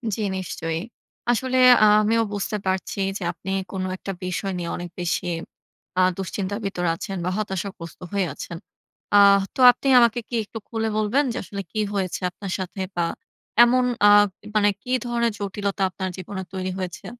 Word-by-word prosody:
জ্বি, - - -4 0.2
নিশ্চয়ই! 165 -3 -3 0.5
আসলে 255 +2 0 0.3
আ - - +8 0.2
আমিও 225 +2 +2
বুঝতে 205 +1 -2
পারছি 190 +1 -2 0.2
যে 195 - -7
আপনি 190 - -7 0.2
কোন 190 -1 -3
একটা 195 - -5
বিষয় 185 +2 -2
নিয়ে 170 -1 -4
অনেক 175 0 -6
বেশি 175 -1 -1 0.7
আ - - +6 0.2
দুশ্চিন্তা 195 +1 -3
ভিতর 180 -3 -2
আছেন 195 +2 -5
বা - - +1
হতাশাগ্রস্ত 190 -4 -5
হয়ে 200 -2 +1
আছেন। 170 - -7 0.6
আহ 200 -1 +7
তো - - -9
আপনি 250 +3 -6
আমাকে 235 0 +4
কি 240 - -3
একটু 215 - -9
খুলে 225 -1 -2
বলবেন 215 +7 +2
যে - - -5
আসলে 200 +2 -6
কি 215 - -3 0.2
হয়েছে 185 -3 -1
আপনার 195 0 -7
সাথে 190 +1 -5
বা 175 - +1 0.6
এমন 250 +1 +4 0.2
আ - - +9 0.5
মানে 205 -1 +4
কি 250 - -7
ধরনের 235 -1 +1
জটিলতা 200 0 -3
আপনার 190 0 -4
জীবনে 190 +1 -6
তৈরি 185 0 -3
হয়েছে? 185 -1 -5
200 Hz, 170 wpm, -23 LUFS, 185-215 Hz, 0.7 s, আ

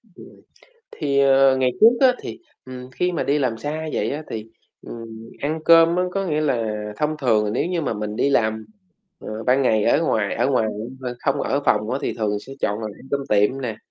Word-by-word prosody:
Ừm. - - -13 0.7
Thì, 140 -2 -1
ờ, 135 -1 +5
ngày 130 -1 +2
trước 230 +2 +7
á 260 -2 +5
thì, - - -7 0.3
ừm, 130 0 -9
khi 180 +9 -1
mà 170 - -2
đi 145 +1 +1
làm 125 -5 -1
xa 155 +6 -4
vậy - - -1
á, 150 +3 -4
thì, 110 -1 -5 0.4
ừm, 115 -1 -10
ăn 155 +3 -2
cơm 165 0 +6
á 180 - +1
có 195 +1 -2
nghĩa 155 -3 0
là 115 -7 -1
thông 150 +1 -1
thường 110 -7 +1
nếu 125 - 0
như 175 -1 -1
mà - - -2
mình 105 0 -4
đi 140 - +1
làm, 110 -4 +1 0.5
ờ, 110 +1 -7
ban 130 +4 +3
ngày 110 -5 +2
ở - - +3
ngoài - - 0
ở - - +1
ngoài 110 - +2 0.3
mà 125 -2 -4
không 140 0 0
ở 140 +2 -1
phòng 105 0 +2
á 130 - -1
thì - - -2
thường 105 -2 -2
sẽ 135 - -11
chọn 105 +1 -1
là 110 - -5
ăn - - -14
cơm 140 - +1
tiệm 105 +6 +2
nè, 115 -4 -4
130 Hz, 225 wpm, -22 LUFS, 110-150 Hz, 0.7 s, trước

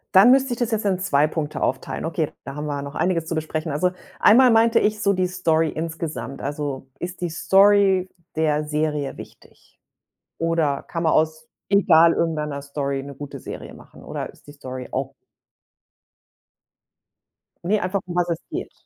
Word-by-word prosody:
Dann 195 +6 +8
müsste 265 -1 +3
ich - - -6
das 240 -2 0
jetzt 220 -1 -1
in 190 -2 +2
2 150 -5 +2
Punkte 155 -1 -4
aufteilen. 130 +4 -2
Okay, 160 -2 -1
da 140 - -7
haben 150 0 -4
wir 145 - -2
ja 140 - -4
noch 140 0 -8
einiges 175 -3 0
zu 165 0 -3
besprechen. 155 0 -3
Also, 180 +5 +1 0.3
einmal 250 +4 +6
meinte 230 0 +5
ich 215 0 0
so 200 - +3
die 185 -1 +1
Story 165 -3 +1
insgesamt. 160 -4 -5
Also, 140 -2 -4
ist 180 +1 -6
die 175 - -1
Story 195 +2 +4 0.3
der 155 -1 +1
Serie 150 -2 -2
wichtig? - - -15 0.6
Oder 165 -4 0
kann 165 0 -4
man 160 - +3
aus 155 0 +1 0.2
egal 170 -4 +5
irgendeiner 150 -4 -2
Story 140 -1 -3
'ne 140 0 -9
gute 145 +1 -8
Serie - - -8
machen, - - -16
oder - - -5
ist - - -24
die - - -9
Story 130 -3 -8
auch 135 +1 -3 2.5
Ne, 210 +4 +2
einfach, 185 +2 -1
um 175 -1 -7
was 175 0 +1
es 165 - 0
geht. - - -4
160 Hz, 175 wpm, -23 LUFS, 145-185 Hz, 2.5 s, Dann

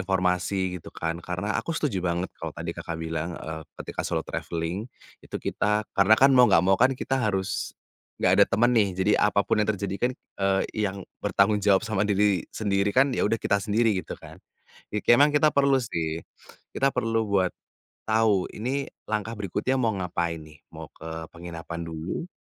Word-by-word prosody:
informasi 90 -1 0
gitu - - -11
kan. 85 +1 -4
Karena 90 +4 -3
aku 165 - -4
setuju 130 - -1
banget 90 0 -2
kalau - - -6
tadi - - -4
Kakak, 85 - -6
bilang, 80 +1 -4
eee, 80 0 -6 0.2
ketika - - -5
solo - - -2
traveling 85 +7 -4 0.3
itu - - -7
kita 105 +1 0
karena 100 +3 +5
kan 135 +1 +6
mau 125 -2 +7
enggak 90 -3 +5
mau 95 +1 +4
kan 130 +1 +4
kita 135 +1 -1
harus 100 -2 -2 0.4
enggak 90 - +2
ada - - +9
teman 120 +5 +3
nih, 110 -4 +4
jadi 95 +3 +2
apa 100 -1 +3
pun 105 - +1
yang 105 - 0
terjadi 95 0 -3
kan, - - -3
eee, 95 -1 -1 0.3
yang 95 -1 -7 0.2
bertanggung 105 +1 +2
jawab 100 +1 +3
sama 110 -3 -1
diri 100 -2 +2
sendiri 100 -2 0
kan, 135 +1 +5
ya 110 - +1
udah 115 - +2
kita 100 -2 0
sendiri 110 +2 +2
gitu - - -8
kan. - - -13 0.7
Memang 145 +5 +7
kita 150 0 +4
perlu 140 -1 +4
sih, 85 -10 -2 0.5
kita 135 - +2
perlu 115 -1 0
buat 95 -2 +2 0.6
tahu 110 -4 +2
ini 130 +6 -2 0.2
langkah 110 +1 -2
berikutnya 105 +5 -1
mau 115 -4 +1
ngapain 85 -3 -2
nih, 75 -1 -16 0.2
mau - - -9
ke 80 0 -7
penginapan 85 0 -7
dulu, 80 - -5
100 Hz, 180 wpm, -26 LUFS, 90-110 Hz, 0.7 s, ada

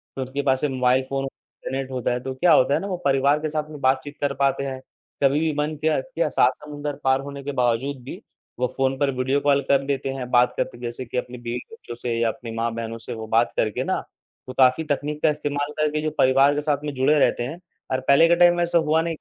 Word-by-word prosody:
तो 135 - -4
उनके 130 +2 -3
पास 135 -2 +1
से 150 - +2
मोबाइल 130 0 +2
फ़ोन, 135 0 -2
इंटरनेट 135 0 -7
होता 125 -2 -1
है 125 - -1
तो 130 +1 -4
क्या 170 +3 +4
होता 130 0 +4
है - - +2
ना 200 - -5
वो 185 -2 -3
परिवार 140 +2 +3
के 155 0 -3
साथ 150 0 -3
में 150 -1 -9
बातचीत 130 +2 0
कर 140 -1 0
पाते 140 0 +1
है। 135 -1 -4 0.4
कभी 140 +2 +4
भी 160 0 +1
मन 150 +1 -1
किया 155 0 +2
किया - - -2
सात - - +3
समुन्दर 145 -1 -5
पार 130 0 +3
होने 140 0 -8
के 145 - -3
बावजूद 125 +1 0
भी 130 - -8 0.4
वो 125 - +2
फ़ोन 135 0 +1
पर 140 0 +1
वीडियो 130 +2 +1
कॉल 140 -1 +3
कर 140 -1 +4
लेते 135 -1 -2
हैं। 125 -2 -5
बात 125 0 +4
करते - - -2
जैसे 120 +1 -5
कि 125 - -5
अपने 125 0 -4
बीवी-बच्चों 120 - -7
से 120 0 -3
या 115 - +2
अपनी 115 0 -7
माँ-बहनों 115 0 -3
से 115 - -7
वो 110 -1 -7
बात 115 +2 +2
करके 110 -1 0
ना - - 0 0.5
वो - - -5
काफ़ी 130 +4 +4
तकनीक 150 +1 -2
का - - +5
इस्तेमाल 145 -1 -2
करके 150 0 0
जो 155 - -1
परिवार 135 +2 +5
के 145 - -1
साथ 150 -1 +1
में 150 -1 -3
जुड़े 135 +3 +3
रहते 120 - +2
हैं। 145 +8 -6 0.3
और 130 - +1
पहले 140 +4 +6
के 170 - +4
टाइम 175 0 +6
में 175 - +1
ऐसा 170 0 +2
हुआ 160 0 +2
नहीं 165 -1 -2
135 Hz, 250 wpm, -23 LUFS, 130-150 Hz, 0.5 s, पहले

